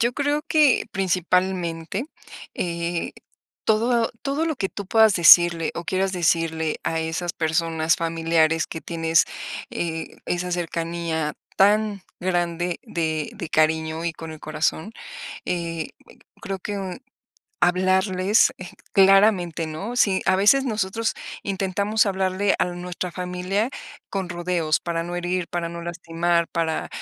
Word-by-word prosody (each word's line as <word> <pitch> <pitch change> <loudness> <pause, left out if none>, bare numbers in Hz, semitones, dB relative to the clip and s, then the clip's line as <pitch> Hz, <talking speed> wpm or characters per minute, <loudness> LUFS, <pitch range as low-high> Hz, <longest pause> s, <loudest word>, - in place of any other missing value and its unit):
Yo 235 +1 +2
creo 290 +2 0
que, 300 -5 +4
principalmente, 185 0 0 0.5
eh, 170 -1 -2 0.5
todo 230 +1 +2
todo 285 +4 -1
lo 315 -3 -1
que 195 -5 -1
tú 200 -1 -7
puedas 220 -1 +5
decirle 170 -1 +7
o 170 - -5
quieras 190 +2 0
decirle 165 -2 0
a 165 - 0
esas 160 +2 -2
personas 160 0 +1
familiares 165 -1 +1
que 160 - -6
tienes, 165 -1 +2 0.5
eh, 165 -1 -4
esa 180 0 -2
cercanía 165 -2 -2 0.2
tan 205 0 +3 0.2
grande 175 -1 -1
de 160 -9 -2
de 180 -7 -6
cariño 160 +1 +1
y 170 - -1
con 160 0 -8
el 155 - -11
corazón, 155 +6 -2 0.5
eh 165 -2 -3 0.5
,creo 195 -1 -4
que 195 -1 -4 0.6
hablarles, 185 +3 +3
eh, 185 - -8 0.2
claramente, 195 -4 +4
¿no?, 160 +10 -5
sí, 195 -5 +3
a 190 - +4
veces 240 +8 +5
nosotros 220 -1 -1 0.3
intentamos 200 +3 0
hablarle 190 0 +1
a - - +3
nuestra 180 0 -5
familia 180 +4 -2 0.4
con 195 -2 -3
rodeos, 175 -3 0
para 170 -1 -2
no 175 +1 -5
herir, 175 0 -1
para 170 -1 -2
no 170 0 -7
lastimar, 170 0 -1
para, 165 -2 -1
175 Hz, 130 wpm, -23 LUFS, 165-195 Hz, 0.6 s, decirle